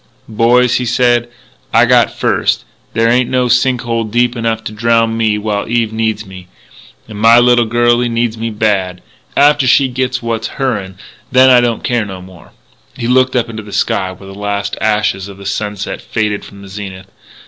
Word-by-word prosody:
"Boys," 120 +2 +2
he 125 - -2
said, 120 0 +2 0.4
"I - - +5
got - - +3
first. - - 0 0.3
There 115 0 +2
ain't 120 +1 +2
no 125 -1 +1
sink 125 +1 +2
hole 115 -2 -2
deep 120 +3 0
enough 115 -1 -2
to - - -6
drowned 115 +1 +1
me 110 -2 +1
while 105 -1 -3
Eve 115 -2 0
needs 110 -1 -2
me.... 95 -1 -12 0.6
And 105 -2 -9
my 115 +2 +6
little 120 -1 +4
girlie 120 +1 +2
needs 115 -1 -1
me 115 0 -4
bad.... 100 -5 -1 0.3
After 145 -2 +4
she 135 +1 +4
gits 130 0 -2
what's 115 -1 -3
her'n, 105 -9 -2 0.3
then 130 0 +6
I 125 -1 +6
don't 120 -2 -1
care 120 -2 0
no 95 -3 -7
more...." 90 -2 -15 0.4
He 115 -2 -4
looked 130 +1 +2
up 120 -2 +1
into 110 -1 -7
the 105 -1 -12
sky, 95 -1 -1
where 95 +1 -13
the 95 - -10
last 100 0 -3
ashes 105 -3 0
of 100 -1 -9
sunset 105 -1 -4
faded 105 -2 -2
from 100 0 -13
the - - -11
zenith.... 95 -1 -9
115 Hz, 185 wpm, -14 LUFS, 105-120 Hz, 0.6 s, my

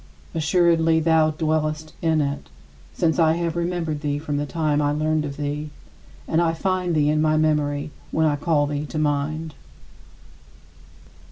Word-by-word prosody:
Assuredly, 165 0 +3
thou 160 -1 +3
dwellest 155 0 -1
in 160 -2 +2
it, 140 - -3 0.4
since 165 0 0
I 160 -1 +5
have 170 0 -2
remembered 170 -3 -2
thee 145 -1 -1
from 145 -1 -3
the 145 0 -2
time 150 -2 0
I 145 0 +1
learned 155 +1 0
of 140 -1 -6
thee, 150 +1 -3 0.6
and 165 +1 +2
I 165 -1 +1
find 180 -1 -1
thee 150 -1 +3
in 155 0 +1
my 155 0 +2
memory 150 -1 0 0.2
when 160 - +1
I 150 -2 +2
call 145 0 +1
thee 145 +1 -3
to 155 - -6
mind. 155 +1 -1
155 Hz, 160 wpm, -23 LUFS, 150-160 Hz, 0.6 s, I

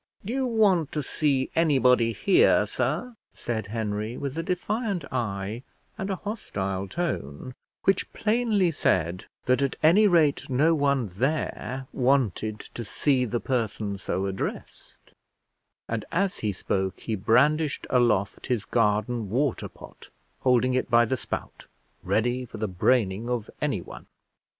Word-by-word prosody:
"Do 225 - -3
you 265 -1 0
want 200 - +3
to 150 - -1
see 135 -1 0
anybody 125 -7 +4
here, 110 - +4
sir?" 150 - -2 0.2
said 110 -3 -3
Henry, 110 +1 -3
with 140 -1 -4
a 165 - -1
defiant 185 - -2
eye 105 -2 -2 0.3
and 195 - -4
a 195 - 0
hostile 100 - -4
tone, 130 - -4 0.3
which 195 -1 +1
plainly 215 -5 +1
said 90 - 0 0.2
that 130 +2 +2
at 140 -2 0
any 195 +7 +6
rate 160 -8 +3
no 145 +6 +3
one 140 -4 +2
there 130 - -2
wanted 120 -5 +1
to 120 - -8
see 125 +6 +1
the 120 +1 -2
person 110 -5 -2
so 95 0 -2
addressed; 95 -1 -6 0.7
and 115 -1 -2
as 190 +2 0
he 105 - -1
spoke 95 0 -2
he 115 - -3
brandished 140 +9 +2
aloft 115 -6 +1
his 120 -6 -1
garden 110 0 0
water 130 +4 0
pot, - - -14 0.3
holding 125 0 +3
it 130 - 0
by 120 0 +5
the 130 - 0
spout, - - -6 0.3
ready 120 +3 0
for 125 - -9
the 110 - -1
braining 105 +3 +1
of 120 -3 -2
anyone. - - -3
125 Hz, 140 wpm, -26 LUFS, 110-155 Hz, 0.7 s, any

